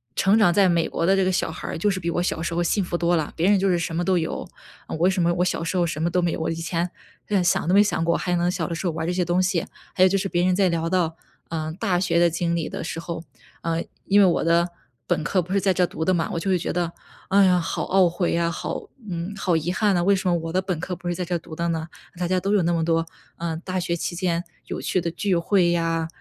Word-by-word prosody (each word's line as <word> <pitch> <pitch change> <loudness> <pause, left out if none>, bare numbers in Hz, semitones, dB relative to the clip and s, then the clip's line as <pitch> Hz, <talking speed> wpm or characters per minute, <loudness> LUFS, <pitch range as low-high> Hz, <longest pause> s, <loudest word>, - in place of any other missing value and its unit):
成 200 +4 +4
长 175 -5 +5
在 195 -2 +4
美 170 -1 +2
国 165 - -2
的 190 - +4
这 195 -1 +2
个 185 - +2
小 180 -3 0
孩 - - -7
儿 - - -3
就 205 +5 +1
是 190 - -2
比 170 -1 -2
我 175 +1 0
小 165 - -1
时 170 0 -2
候 175 - +1
幸 200 +4 +1
福 175 -1 -2
多 170 0 +2
啦。 155 - -3
别 175 +5 +2
人 205 -2 +4
就 195 - +1
是 175 - +3
什 165 -1 -3
么 175 +1 -1
都 185 -2 +3
有， 160 - -3 0.4
嗯， - - -4
为 175 +4 +3
什 190 -2 0
么 170 0 +3
我 180 +1 +1
小 180 - -1
时 170 +3 -3
候 175 -1 +3
什 155 -2 -3
么 170 - +1
都 180 +1 +1
没 170 -1 +1
有， - - -3
我 160 - -1
以 165 - -2
前 170 +1 -2 0.4
就 210 - -1
连 185 - +3 0.2
都 180 - +2
没 205 - +7
想 165 -5 0
过， 170 - +2
还 180 - -1
能 175 +1 +1
小 180 -3 -1
的 170 - -4
时 175 +2 -2
候 165 - -1
玩 160 0 -3
儿 - - -3
这 175 - 0
些 180 0 0
东 175 +2 +2
西。 180 -3 0 0.3
还 185 - +3
有 - - +8
就 195 - +2
是 195 0 -2
别 175 0 +1
人 185 -1 +3
在 195 -2 +3
聊 165 -1 -1
到， 170 -3 0 0.3
嗯， 160 -1 -3
大 180 -1 0
学 175 -2 +1
的 175 0 +5
经 170 +1 -1
历 165 - -2
的 - - -5
时 165 - -5
候， 170 -1 -5 0.4
嗯， 165 0 -1 0.2
因 205 +1 +5
为 - - +7
我 175 - +2
的 170 +1 +3 0.4
本 170 -3 0
科 185 +4 +1
不 180 +2 -9
是 200 - +3
在 190 -1 +2
这 180 - +2
儿 - - +2
读 160 +1 -4
的 185 - +3
嘛。 165 -2 0
我 170 - -1
就 195 - -2
会 185 - +3
觉 170 - -3
得， 170 -1 -1 0.3
哎 200 +1 +5
呀， 180 -1 +4
好 165 - -2
懊 190 -1 +4
悔 175 +1 -1
呀， 170 0 +1
好， 170 - -4 0.2
嗯， 175 +3 -4
好 180 -3 +1
遗 160 +2 -2
憾 200 +2 +2
呐， 175 - +2
为 200 +2 +4
什 185 -1 -1
么 175 - +3
我 165 -1 -3
的 185 - +2
本 185 -4 -3
科 180 +2 -4
不 175 - -5
是 175 - -1
在 180 - -3
这 175 +1 -2
儿 170 - -1
读 160 - -12
的 170 0 -1
呢？ 160 0 -2 0.3
大 180 - -1
家 185 0 +2
都 200 +3 -1
有 205 - +4
那 170 - +1
么 165 -1 +1
多， 165 0 +1 0.3
嗯， 165 -1 -3
大 185 -1 -2
学 170 0 -1
期 175 - -3
间 175 -1 -1 0.2
有 - - -4
趣 185 - 0
的 170 0 -2
聚 190 +2 0
会 175 0 +3
呀， 165 -1 0
175 Hz, 335 characters per minute, -24 LUFS, 165-185 Hz, 0.4 s, 有